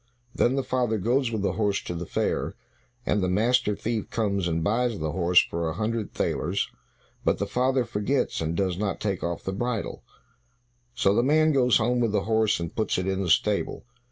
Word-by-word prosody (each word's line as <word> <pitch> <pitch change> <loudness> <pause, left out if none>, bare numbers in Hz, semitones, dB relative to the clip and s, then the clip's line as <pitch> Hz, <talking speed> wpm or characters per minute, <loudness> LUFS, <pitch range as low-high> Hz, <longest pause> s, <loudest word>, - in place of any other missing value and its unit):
Then 125 +2 +2
the 135 - 0
father 120 -4 0
goes 120 +5 +1
with 110 -3 -2
the - - +1
horse 105 -2 0
to - - -4
the 85 0 -5
fair, - - -1 0.5
and 105 - +1
the 90 - +1
master 110 +3 +2
thief 110 +1 -3
comes 100 -5 0
and 80 -1 -1
buys 115 +4 +1
the 80 -1 -2
horse 90 0 +4
for 85 -1 -3
a - - -3
hundred 110 +2 -2
thalers, 90 +5 -1 0.5
but - - +2
the - - -1
father 130 0 +1
forgets, 115 +2 -1
and 80 +1 -2
does 95 -2 0
not 100 -2 -1
take 100 -3 -2
off 85 -1 -3
the 95 - -3
bridle. 120 +1 -3 0.9
So 100 -6 +3
the 110 - +3
man 155 +4 +4
goes 125 -5 +4
home 120 +2 +1
with 115 -3 +1
the 100 -2 +1
horse, 110 -1 +2
and 85 -1 -5
puts 110 - 0
it 95 - -1
in 95 0 -1
the 90 - -2
stable. 105 +7 +1
105 Hz, 205 wpm, -26 LUFS, 95-120 Hz, 0.9 s, horse